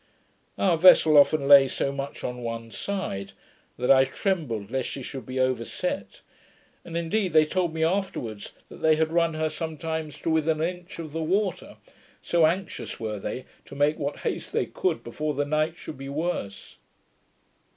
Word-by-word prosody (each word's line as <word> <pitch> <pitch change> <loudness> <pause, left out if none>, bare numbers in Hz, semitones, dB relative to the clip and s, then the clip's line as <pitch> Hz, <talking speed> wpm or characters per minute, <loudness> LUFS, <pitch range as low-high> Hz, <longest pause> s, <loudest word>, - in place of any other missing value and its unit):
Our 175 -4 +2
vessel 160 -3 +7
often 145 0 +5
lay 140 -1 +9
so 135 - -2
much 140 0 -6
on 125 0 -4
one 115 -1 -5
side, 110 - -4 0.4
that 125 +2 +2
I 135 -1 +7
trembled 130 - -2
lest 130 -1 -1
she 135 - -6
should 130 -2 -7
be 130 0 -3
overset, 130 -3 -2 0.6
and 170 -1 -5
indeed 175 +2 -1
they 155 -1 +6
told 175 +1 0
me 160 0 -2
afterwards, 160 - -2 0.2
that - - -11
they 160 -1 +5
had 160 0 0
run 170 -1 +2
her 155 0 0
sometimes 160 -1 -4
to 165 - 0
within 160 0 +1
an 160 - +2
inch 175 +2 -13
of 160 -3 -7
the 165 +2 -3
water, 185 +3 -1 0.4
so 170 -2 +3
anxious 185 +4 -3
were 110 -2 -4
they 125 +6 -5 0.2
to - - -11
make 145 +2 +2
what 145 0 -3
haste - - -3
they - - +1
could - - -2
before 150 -1 -3
the 145 +1 0
night 155 +3 0
should 150 - -9
be 135 0 -6
worse. 140 - -4
155 Hz, 175 wpm, -26 LUFS, 130-165 Hz, 0.6 s, lay